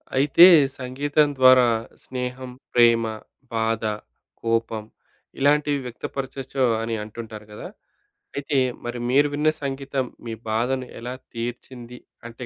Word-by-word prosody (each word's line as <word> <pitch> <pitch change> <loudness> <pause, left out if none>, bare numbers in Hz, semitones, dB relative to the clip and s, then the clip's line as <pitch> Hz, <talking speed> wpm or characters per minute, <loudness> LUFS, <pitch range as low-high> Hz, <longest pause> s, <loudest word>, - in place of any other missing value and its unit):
అయితే, 140 +5 +7 0.3
సంగీతం 145 +4 +1
ద్వారా 130 -1 +7 0.4
స్నేహం, 125 0 -5 0.2
ప్రేమ, 115 -1 +5 0.5
బాధ, 115 0 0 0.6
కోపం 115 -1 -1 0.6
ఇలాంటివి 145 +1 +2
వ్యక్త 120 -1 -7
పరచచ్చో 135 -1 -2 0.2
అని 115 0 -2
అంటుంటారు 110 0 -9
గదా! 105 - -8 0.7
అయితే, 140 0 -1 0.3
మరి 120 0 -4
మీరు 145 +3 +4
విన్న 150 +2 +2
సంగీతం 135 -1 -2 0.2
మీ 115 - -4 0.2
బాధని 125 +4 -1
ఎలా 120 +2 -5 0.2
తీర్చింది 120 +1 -7 0.3
అంటే 120 +2 -9
125 Hz, 110 wpm, -23 LUFS, 115-135 Hz, 0.7 s, అయితే